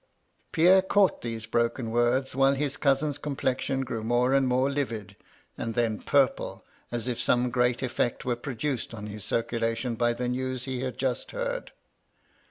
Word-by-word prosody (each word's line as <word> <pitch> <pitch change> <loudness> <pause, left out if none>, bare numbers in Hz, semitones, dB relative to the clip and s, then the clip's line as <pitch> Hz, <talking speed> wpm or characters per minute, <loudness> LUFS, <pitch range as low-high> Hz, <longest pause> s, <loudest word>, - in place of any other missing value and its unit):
Pierre 185 +4 +6
caught 195 +1 +3
these 115 -2 -4
broken 115 0 0
words 120 +3 +2
while 135 +1 +4
his 145 0 -1
cousin's 145 0 +1
complexion 135 -2 -1
grew 120 -4 -4
more 120 +3 +2
and 135 -1 +4
more 130 +1 +2
livid, 130 -8 -3 0.4
and 115 -1 -3
then 115 -3 +1
purple, 140 -3 +1 0.3
as 120 0 -2
if 120 -2 -2
some 125 0 +2
great 125 0 +2
efiiBCt 125 0 -1
were 125 -1 +1
produced 125 0 -3
on 105 -1 -7
his 105 -1 -7
circulation 115 +2 -1
by 120 +1 +1
the 125 +1 -3
news 130 0 -2
he 130 -1 -3
had 130 -2 -3
just 130 -1 -1
heard. - - -3
125 Hz, 165 wpm, -27 LUFS, 115-135 Hz, 0.4 s, Pierre